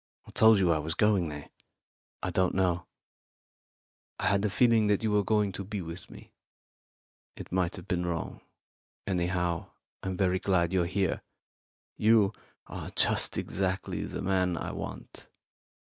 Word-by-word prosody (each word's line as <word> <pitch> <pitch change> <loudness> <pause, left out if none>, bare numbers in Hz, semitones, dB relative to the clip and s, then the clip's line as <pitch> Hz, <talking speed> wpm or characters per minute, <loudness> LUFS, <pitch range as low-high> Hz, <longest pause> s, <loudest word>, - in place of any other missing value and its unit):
I - - -11
told 110 -1 +6
you 90 -3 +3
I 80 - +2
was 80 +2 -3
going 100 -6 +2
there." 75 -1 -8 0.7
"I - - -1
don't 95 -1 +1
know. 90 -2 +1 1.3
I - - +1
had 100 0 +2
a 105 - +2
feeling 115 0 +4
that 105 +1 +1
you 110 - +1
were 105 0 +3
going 105 -1 +1
to 100 - -5
be 105 +1 -5
with 85 +2 -8
me. - - -14 1.0
It - - -10
might 90 -1 0
have 95 -1 -10
been 90 -1 -1
wrong. 85 -2 -4 0.6
Anyhow, 90 -2 -1 0.3
I'm 95 -1 -3
very 95 -1 +2
glad 90 -3 +1
you're 90 -2 +2
here. 95 0 0 0.8
You 110 -2 +4 0.3
are - - -7
just - - +3
exactly 95 -1 -2
the - - -5
man 90 -2 +1
I - - -4
want. - - -8
95 Hz, 155 wpm, -29 LUFS, 85-100 Hz, 1.3 s, told